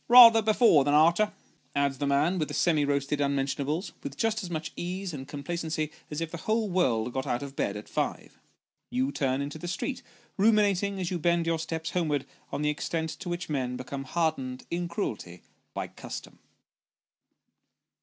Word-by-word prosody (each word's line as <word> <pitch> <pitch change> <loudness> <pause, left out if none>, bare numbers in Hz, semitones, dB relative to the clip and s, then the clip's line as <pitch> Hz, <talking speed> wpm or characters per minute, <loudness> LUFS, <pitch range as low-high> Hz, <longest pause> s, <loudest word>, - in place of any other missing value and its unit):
"Bather 235 -2 +10
before 215 - +5
than 145 +1 +2
arter," 170 +7 +5 0.4
adds 140 -2 +1
the 145 - 0
man 150 +7 +2
with 155 - 0
the - - -5
semi 160 -4 +3
roasted 140 0 0
unmention 140 0 0
ables, 155 +8 -2
with 285 - -7
just 225 -1 +1
as 180 - -6
much 155 -2 -4
ease 180 +1 -4
and 135 -2 -6
complacency 155 +1 -3 0.2
as 150 - -4
if 165 -1 -3
the 170 - -5
whole 220 +4 0
world 125 -10 +1
got 130 - -2
out 120 +3 -1
of 140 -1 -8
bed 100 -5 -1
at 105 - -9
five. - - -3 0.5
You 130 +2 0
turn 135 -1 0
into 145 +2 -6
the 175 - -6
street, 220 +10 -3 0.4
ruminating 200 -2 +3
as 180 -1 -2
you 180 - -1
bend 170 +1 +2
your 165 -1 +1
steps 160 0 -3
homewards 155 -6 0 0.3
on 150 - -2
the 150 - +3
extent 160 +2 -2
to 180 - -5
which 175 0 -3
men 130 -4 -2
become 135 +2 -6
hardened 135 -5 -1
in 175 0 -1
cruelty, 105 - -4 0.3
by - - -2
custom. - - -9
160 Hz, 185 wpm, -28 LUFS, 140-175 Hz, 0.5 s, Bather